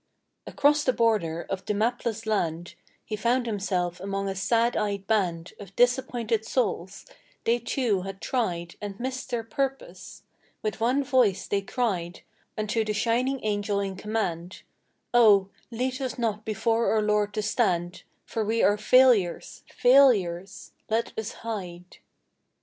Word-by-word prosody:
Across 295 +1 +2
the 255 - +3
border 205 -9 +1
of 195 -1 -4
the 210 - -2
mapless 230 0 -1
land 175 -5 -1 0.3
He 215 - -3
found 240 +3 +1
himself 190 -5 -2
among 195 +1 -3
a 195 - -1
sad 230 +5 +1
eyed 200 -2 -2
band 180 -6 -1
Of 195 -1 -11
disappointed 245 -3 +1
souls; 195 -6 -2 0.4
they, 235 +1 +2
too, 235 -4 0
had 195 +1 -7
tried 175 -10 -2
And 205 -1 -6
missed 255 +1 -4
their 240 -3 -2
purpose. 270 +3 -5 0.4
With 215 -1 -3
one 250 +5 +2
voice 250 -7 +2
they 200 - 0
cried 195 -6 -2 0.4
Unto 215 +1 0
the 215 -1 -2
shining 245 +5 0
Angel 205 -1 0
in 195 -1 -3
command: 185 -4 -3 0.5
'Oh, 205 -5 +6 0.2
lead 255 +3 -3
us 260 -2 -3
not 220 -3 -2
before 225 +2 +1
our 220 - +2
Lord 210 -1 +1
to 215 - -1
stand, 180 -6 0 0.2
For 225 - -2
we 225 +2 0
are 205 +1 +4
failures, 230 -6 +3
failures! 210 -9 +3 0.2
Let 225 +1 -1
us 220 0 -4
hide. 180 -5 -6
215 Hz, 145 wpm, -26 LUFS, 195-240 Hz, 0.5 s, Oh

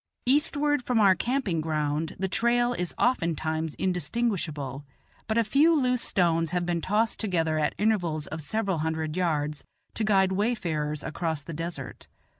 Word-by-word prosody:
Eastward 290 +1 +3
from 245 -2 +1
our 200 -3 +6
camping 220 - -1
ground 155 0 -1
the 190 - -1
trail 240 +5 +2
is 180 -7 -3
oftentimes 160 - 0
indistinguishable; 165 - -2 0.4
but 220 +1 0
a 230 - +4
few 295 +8 +4
loose 250 -2 +1
stones 165 -3 +1
have 175 0 -1
been 170 -1 -1
tossed 215 +5 +1
together 165 -7 0
at 150 - 0
intervals 175 -8 0
of 155 - -6
several 195 +2 -1
hundred 160 0 -2
yards, 150 -4 -1 0.3
to 225 - -1
guide 195 -3 +3
wayfarers 170 -8 -1
across 160 -2 -3
the 165 - -7
desert. 165 -4 -6
175 Hz, 150 wpm, -27 LUFS, 155-220 Hz, 0.4 s, our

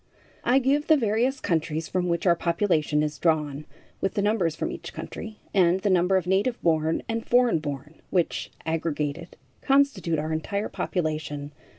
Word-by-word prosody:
I 245 +3 +4
give 275 +3 +2
the 315 - +6
various 240 +3 +1
countries 160 -4 -1
from 180 -1 -1
which 170 +1 -1
our 175 -2 +5
population 170 -4 +1
is 150 -1 -3
drawn, 150 -3 0 0.4
with 195 - -1
the 200 - +1
numbers 200 -7 +1
from - - -3
each - - -8
country, 220 -1 -7 0.2
and 185 -1 +3
the 200 - +1
number 185 +1 +3
of 185 - -1
native 195 +7 +1
born 160 -1 +1
and 225 0 -2
foreign 245 -8 +3
born, 150 +1 -7
which, 175 -3 0 0.2
aggregated, 160 0 -2 0.2
constitute 270 - +2
our 155 +1 -2
entire 200 +6 -2
population. 155 -4 -3
170 Hz, 165 wpm, -26 LUFS, 155-210 Hz, 0.4 s, the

